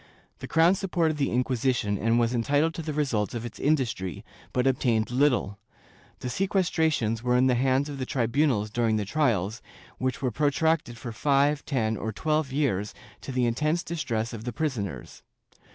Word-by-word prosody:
The - - -7
crown 165 +3 +4
supported 175 -5 0
the 140 -2 +1
Inquisition 125 -3 0
and 115 +2 +2
was 120 +1 +1
entitled 145 +7 +1
to 165 - -5
the 155 -1 -4
results 130 -9 -1
of 115 0 -4
its 120 - -8
industry, 120 - -1 0.3
but 125 0 0
obtained 120 -4 +1
little. 125 -7 +1 0.6
The - - -4
sequestrations 160 - 0
were 125 0 +2
in 130 - +4
the 130 - +4
hands 130 +3 +2
of 145 -2 -6
the 130 - -2
tri 125 -4 0
bunals 120 -4 +1
during 115 -1 +1
the 105 -1 -1
trials, 110 - 0 0.4
which 130 0 -1
were 130 -2 -1
protracted 145 -1 +1
for 120 -1 -6
five, 140 +5 +2
ten 110 -6 0
or 110 +3 -3
twelve 155 +3 -1
years 120 -8 -1 0.3
to - - -6
the 125 -1 +1
intense 150 +9 0
distress 115 -9 -3
of 110 -1 -7
the 120 - -3
prisoners. 120 - -4
130 Hz, 175 wpm, -27 LUFS, 115-150 Hz, 0.6 s, crown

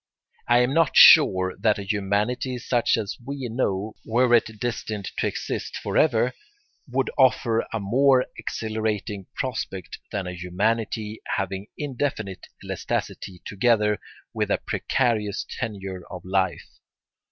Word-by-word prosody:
I 120 +1 +5
am 125 +2 +1
not 165 -2 +3
sure 95 0 +8
that 110 -2 +3
a 100 - -5
humanity 105 +5 -1
such 120 0 +1
as 105 -3 -3
we 135 0 -5
know, 110 -3 -1
were 120 +2 +2
it 110 -2 +2
destined 110 -4 -3
to - - +1
exist - - -4
for - - -4
ever, - - +3 0.6
would 130 +1 0
offer 120 -3 +3
a 115 - -2
more 125 +5 +3
exhilarating 110 -3 -3
prospect 110 -8 -4
than 100 -2 -2
a 90 - -5
humanity 105 +4 -2 0.2
having 95 +1 -3
indefinite 130 -9 -3 0.2
elasticity 90 -2 -4
together 105 0 +2 0.3
with - - -1
a - - +2
precarious 110 -6 -1
tenure 95 -5 -4
of 90 -1 -8
life. 95 -1 0
110 Hz, 130 wpm, -24 LUFS, 100-125 Hz, 0.6 s, sure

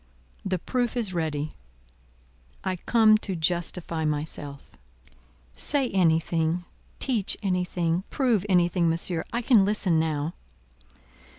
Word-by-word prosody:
The 190 -1 -1
proof 245 +7 -2
is 215 -6 -2
ready. 155 -3 -2 1.1
I 185 - -1
come 215 +3 +4
to 195 -3 -4
justify 170 0 -1
myself." 145 -2 -4 0.8
"Say 275 - +1
anything, 165 -1 +1 0.3
teach 230 -8 0
anything, 180 -2 0
prove 240 -8 +1
anything, 175 -2 +3
Monsieur; 165 0 -1
I 235 +1 -2
can 230 -4 +5
listen 195 -5 +2
now." 155 0 -1
175 Hz, 105 wpm, -26 LUFS, 160-205 Hz, 1.1 s, can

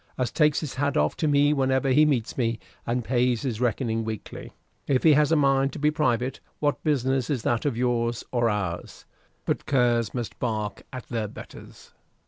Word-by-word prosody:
as 125 -3 -1
takes 150 -2 +2
his 150 -5 -5
hat 140 +1 -1
off 75 0 +1
to 155 - -1
me 145 0 +4
whenever 135 -1 +1
he 150 +4 +5
meets 125 -6 0
me, 115 -3 0 0.3
and 120 +1 0
pays 125 -1 +1
his 120 -4 -3
reckoning 115 -2 0
weekly. 110 -1 -7 0.4
If 130 -2 +1
he 160 - +7
has 150 +1 +3
a - - +5
mind 135 -2 +2
to - - -6
be 150 +1 +2
private, 130 -4 0 0.2
what 145 -1 -1
business 135 -4 0
is 130 -7 -1
that 120 +2 0
of 135 -6 0
yours, 120 -1 0
or 120 -2 +2
ours? 100 -5 -4 0.4
But - - -2
curs 120 -5 +2
must 120 -3 -5
bark 110 -4 -2
at 130 -2 -7
their 115 -3 -2
betters." - - -12
125 Hz, 190 wpm, -25 LUFS, 115-140 Hz, 0.4 s, he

